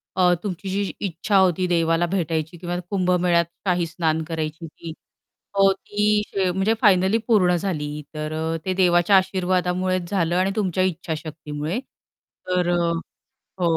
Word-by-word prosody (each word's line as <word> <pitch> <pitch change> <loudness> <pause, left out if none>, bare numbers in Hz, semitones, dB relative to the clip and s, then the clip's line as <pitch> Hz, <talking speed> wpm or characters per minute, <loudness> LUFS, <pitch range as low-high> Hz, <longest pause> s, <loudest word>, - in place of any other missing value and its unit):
अ, 180 -1 +4
तुमची 190 -1 -4
जी 195 +1 -1
इच्छा 195 +3 0
होती 185 -1 +3
देवाला 165 -1 +2
भेटायची 165 -2 -2
किंवा 175 +1 -4
कुंभमेळ्यात 180 -3 +2 0.2
काही 180 -2 +1
स्नान 160 -1 -1
करायची 160 0 -4
ती, 165 +1 -9 0.6
हो 195 0 +5
ती 210 +2 0
शे 190 -2 0
म्हणजे 190 +4 +1
फायनली 190 0 +4
पूर्ण 185 -6 +4
झाली. 150 -5 -3
तर, 155 0 -4 0.3
ते 185 - 0
देवाच्या 180 +1 +4
आशीर्वादामुळेच 185 -1 0
झालं 175 -4 0
आणि 190 +1 +2
तुमच्या 185 -4 0
इच्छाशक्तीमुळे. 155 0 -3 0.7
तर, 180 -1 +1 0.9
अ - - -1
180 Hz, 130 wpm, -23 LUFS, 165-190 Hz, 0.9 s, हो